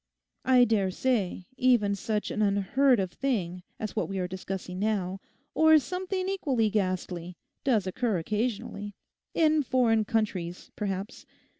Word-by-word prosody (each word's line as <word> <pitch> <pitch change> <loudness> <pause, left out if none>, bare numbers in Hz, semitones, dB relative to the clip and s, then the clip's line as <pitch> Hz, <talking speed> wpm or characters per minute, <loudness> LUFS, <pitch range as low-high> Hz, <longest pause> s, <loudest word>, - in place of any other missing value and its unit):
I 255 -1 +6
dare 205 -5 +2
say 195 -4 -1
even 240 -6 +3
such 210 +1 -2
an 215 - -1
unheard 215 +6 +3
of 185 -2 -1
thing 185 -10 -2 0.2
as 215 - -4
what 215 - -1
we 195 - -3
are 180 -1 -1
discussing 185 0 -5
now, 195 -3 -1 0.3
or 315 0 +6
something 370 +4 -2
equally 265 - +1
ghastly, 180 -3 -2 0.3
does 230 -9 +2
occur 210 +2 0
occasionally. 205 +1 -3 0.4
In 310 -1 +4
foreign 235 -5 +2
countries, 195 -6 -2
perhaps. 200 +1 -4
210 Hz, 135 wpm, -28 LUFS, 190-255 Hz, 0.4 s, I